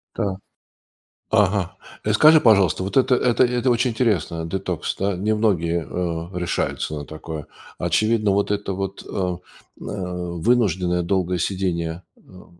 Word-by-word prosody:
Так. 100 -4 -1 0.9
Ага. 100 -3 +1 0.3
И 105 - +2
скажи, 155 +8 +7
пожалуйста, 100 -6 +4
вот 95 +7 -2
это 130 -1 +4
это 125 0 +3
это 125 +1 0
очень 120 +1 +2
интересно, 105 -8 0
детокс. 90 -1 -3
Да? 100 -1 0
Немногие, 90 -6 0
э, 85 0 -3
решаются 90 -2 -2
на 75 - -6
такое. 80 0 -7 0.3
Очевидно, 110 -2 +1
вот 100 +1 +1
это 100 -1 -2
вот, 95 +1 -5
э, - - -17
м, 90 -2 -2 0.4
э, 90 -3 -5
вынужденное 90 -6 +2
долгое 90 0 0
сидение, 85 -2 -2
эм, 90 -2 -18
95 Hz, 140 wpm, -22 LUFS, 85-110 Hz, 0.9 s, скажи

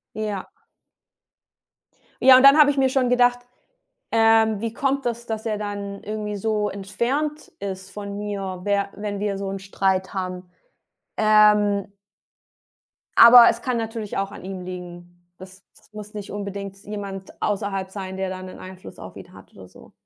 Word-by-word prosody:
Ja. 210 -3 -4 1.7
Ja, 260 0 +9
und 255 - +5
dann 275 +2 +8
habe 295 -1 +7
ich 285 - -2
mir 270 -1 +3
schon 260 -1 +1
gedacht: 245 0 +3 0.7
„Ähm 225 -1 +3
wie 230 -1 -3
kommt 275 +2 -1
das, 235 0 -3
dass 220 -1 -5
er 215 -2 -1
dann 200 -1 -6
irgendwie 210 -1 -4
so 210 0 -1
entfernt 240 +11 -3
ist 190 -1 -6
von 200 0 -7
mir, 195 -3 -5
wer 200 0 0
wenn 205 -1 -5
wir 205 -1 -2
so 195 0 -4
'nen 195 - -5
Streit 190 -1 -1
haben?“ 185 -1 -5 0.7
Ähm 210 -2 +4 1.3
aber 235 0 +10
es 235 +1 -5
kann 255 -2 -1
natürlich 225 -2 -4
auch 195 0 -2
an - - -11
ihm 190 -1 -6
liegen. 175 -1 -9 0.2
Das 190 +1 -13
das - - -24
muss 210 0 -10
nicht 205 -2 -7
unbedingt 200 -1 -6
jemand 200 -2 -7
außerhalb 195 -2 -2
sein, 190 -1 -7
der 190 0 -2
da 185 0 -6
'nen 185 0 -10
Einfluss 185 0 -11
auf - - -11
ihn - - -12
hat - - -16
oder - - -13
so. - - -18
205 Hz, 165 wpm, -23 LUFS, 195-225 Hz, 1.7 s, aber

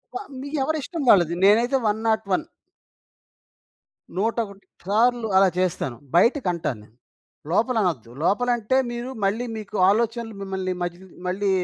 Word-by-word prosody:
వ - - +1 0.2
మీఎవరిష్టం 295 +3 -2
వాళ్ళది. 175 -3 +5
నేనైతే 235 +6 +4
101. 220 +3 0 1.7
101 210 -2 -2 0.2
సార్లు 230 +3 +2
అలా 190 -1 +6
చేస్తాను. 150 -9 -1 0.2
బయటికంటాను 175 - +2
నేను. 110 +2 -22 0.6
లోపల 230 +5 +2
అనొద్దు. 130 -11 -2
లోపలంటే 240 +4 +1
మీరు 240 +2 -5
మళ్ళీ 225 +5 0
మీకు 210 -1 -6
ఆలోచనలు 230 0 0
మిమ్మల్ని 190 -1 -3
మధ్య 175 0 -3 0.3
మళ్ళీ 195 +2 0
215 Hz, 110 wpm, -24 LUFS, 185-240 Hz, 1.7 s, అలా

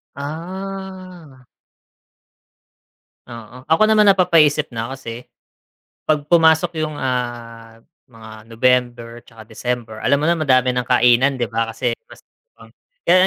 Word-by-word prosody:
Ah. 180 -2 -8 1.8
Oo, 120 +2 -12
ako 160 - +2
naman 215 -1 +4
napapaisip 165 -6 +3
na 115 -1 -4
kasi, 120 -2 -9 0.8
pag 150 -2 +1
pumasok 165 0 +3
yung, 155 - -8
ah, 120 -3 -5 0.2
mga 110 -2 -14
November 120 0 0
'tsaka 115 -2 -14
December, 115 -1 -4
alam 140 +5 +1
mo 160 - +2
na 170 - +1
madami 130 -4 +2
ng 125 -1 -2
kainan 125 +2 +3
di 120 -3 -3
ba 115 0 -1
kasi 120 +2 -1 0.2
Pasko - - -16 0.4
na, - - -16 0.3
kaya 185 +1 +4
130 Hz, 120 wpm, -19 LUFS, 115-160 Hz, 1.8 s, naman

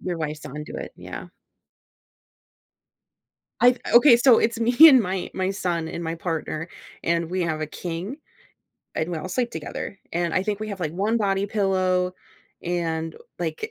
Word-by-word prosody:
Your 175 -2 -3
wife's 155 -1 -4
onto 150 +3 -7
it, - - -6
yeah. - - -8 2.3
I've 245 0 +5 0.2
okay, 240 0 +8
so 240 -1 +6
it's 230 0 +1
me 240 +2 +1
and 265 -4 +7
my 190 -3 -3
my 190 0 0
son 175 -4 -2
and 170 - -5
my 165 0 -2
partner, 165 -1 -4 0.4
and 170 0 0
we 185 0 0
have 160 -2 -1
a 155 - -2
king, 175 - -5 0.8
and 160 +3 -2
we 165 - -2
all 185 - -6
sleep 240 +5 -1
together, 165 +5 -6
and 170 -1 -1
I 185 - +2
think 210 +1 -2
we 215 - -4
have, 195 -3 -6
like, 155 -2 -2
one 205 +6 0
body 200 -2 +1
pillow 185 -3 +1 0.5
and, 165 -2 -2 0.2
like 160 -3 -3
180 Hz, 165 wpm, -24 LUFS, 165-205 Hz, 2.3 s, okay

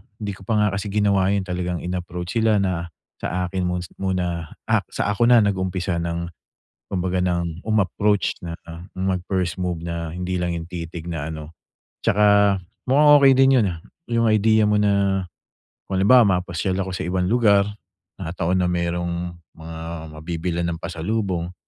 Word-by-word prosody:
di 105 -1 -4
ko 95 -1 -12
pa 115 - +1
nga 105 -1 +3
kasi 100 +2 -3
ginawa 100 -2 +2
yun 100 - 0
talagang 90 -2 -3
in-approach 90 +2 -3
sila 110 -3 +3
na 85 -3 -1 0.3
sa 90 +1 -2
akin 95 -1 -1
mo 90 0 -2 0.2
muna, 90 -4 -2 0.3
sa 105 - -1
ako 115 +4 +2
na 120 -2 +6
nag-umpisa 95 -2 -1
ng, 85 0 -3 0.5
kumbaga 95 -1 -2
ng 85 -1 -2
umapproach, 105 -1 +1
na 85 - -4 0.4
mag-first 95 -1 -1
move, 90 -2 -2
na 85 -1 -4
hindi 90 +1 -2
lang 90 -1 -1
yung 85 -1 -5
titig 85 -1 -6
na 80 -2 -3
ano. 80 +1 -9 0.5
'Tsaka 100 -1 +4 0.3
mukhang 145 +3 +6
okey 135 -1 +7
din 135 0 +6
yun, - - +2
ah, 85 -2 -6 0.3
yung 115 0 +2
idea 110 0 +4
mo 105 0 +3
na 100 -2 +2 0.6
kung 95 -1 -1
halimbawa 100 -4 +5
mapasyal 90 +1 -2
ako 95 -1 -4
sa 95 - -4
ibang 90 0 0
lugar 105 -4 +4 0.5
na 85 -3 -5
taon 90 +1 0
na - - +2
merong 85 0 -2 0.2
mga 80 0 -9 0.4
mabibilan 85 +2 -3
ng 85 -1 -3
pasalubong 90 0 -2
90 Hz, 160 wpm, -22 LUFS, 85-100 Hz, 0.6 s, okey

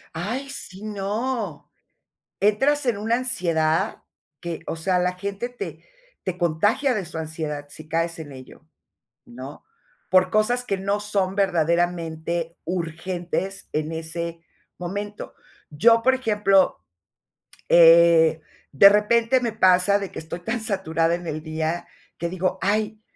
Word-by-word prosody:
¡Ay, 240 +11 -4
sí, 195 -6 -6
no! 210 - -3 0.7
Entras 270 +9 +2
en 225 -4 +1
una 225 +3 +1
ansiedad 180 -7 0 0.4
que, 170 -1 -5
o - - -3
sea, 180 +2 +1
la 180 0 0
gente 200 +5 -4
te 245 - -8 0.4
te 185 -1 -4
contagia 205 - +1
de 205 -5 -2
su 165 -1 -7
ansiedad 155 -2 -5
si 155 +1 -11
caes 165 +1 -1
en 145 -3 -8
ello, 130 +3 -13 0.6
¿no? 130 +4 -10 0.4
Por 185 0 +4
cosas 235 +4 +2
que 195 - -1
no 200 +2 -1
son 200 -2 -1
verdaderamente 170 -2 0
urgentes 175 +3 -3
en 155 +1 -2
ese 165 +1 -5 0.3
momento. 200 +4 -6 0.3
Yo, 230 +10 +4
por 260 +2 +4
ejemplo, 210 -6 +2 0.9
eh, 165 -1 +6 0.3
de 200 +9 +9
repente 230 +4 +3
me 235 -3 -2
pasa 185 -1 +4
de 200 -2 -5
que - - -7
estoy 160 +2 -7
tan 225 +5 -2
saturada 170 -6 0
en 175 - -8
el 155 -1 -4
día, 160 +2 -3 0.3
que 170 - -2
digo: 185 +1 -1
"Ay, 215 +2 0
185 Hz, 135 wpm, -23 LUFS, 165-210 Hz, 0.9 s, de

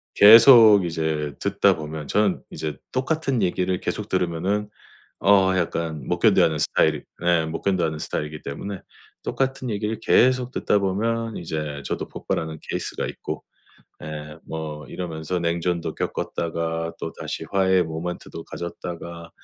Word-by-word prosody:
계속 110 -2 +9
이제 80 -3 -2
듣다 - - +3
보면 75 -1 -6
저는 105 -3 +1
이제 75 -3 -5
똑같은 135 -1 0
얘기를 90 0 0
계속 105 +1 -4
들으면은 95 +4 -1 0.5
어 95 -2 +5
약간 80 -4 -2
못 - - 0
견뎌 - - +5
하는 80 -2 +2
스타일이 75 +1 +2 0.2
예 85 -2 +3
못 80 +1 -5
견뎌 95 -4 +1
하는 80 -1 -3
스타일이기 75 0 -4
때문에 95 +7 -5 0.4
똑같은 135 -1 -2
얘기를 105 +1 -2
계속 125 +2 +3
듣다 105 - +1
보면 115 +4 -1
이제 75 -3 -4
저도 - - -3
폭발하는 80 -1 -4
케이스가 - - -3
있고. - - -6 0.6
예 75 0 -7 0.2
뭐 75 -2 -5
이러면서 85 +1 -4
냉전도 85 -1 -1
겪었다가 80 0 -3
또다시 - - -5
화해의 95 -2 +3
모멘트도 80 +1 -6
가졌다가 85 -1 -7
85 Hz, 320 characters per minute, -23 LUFS, 80-100 Hz, 0.6 s, 계속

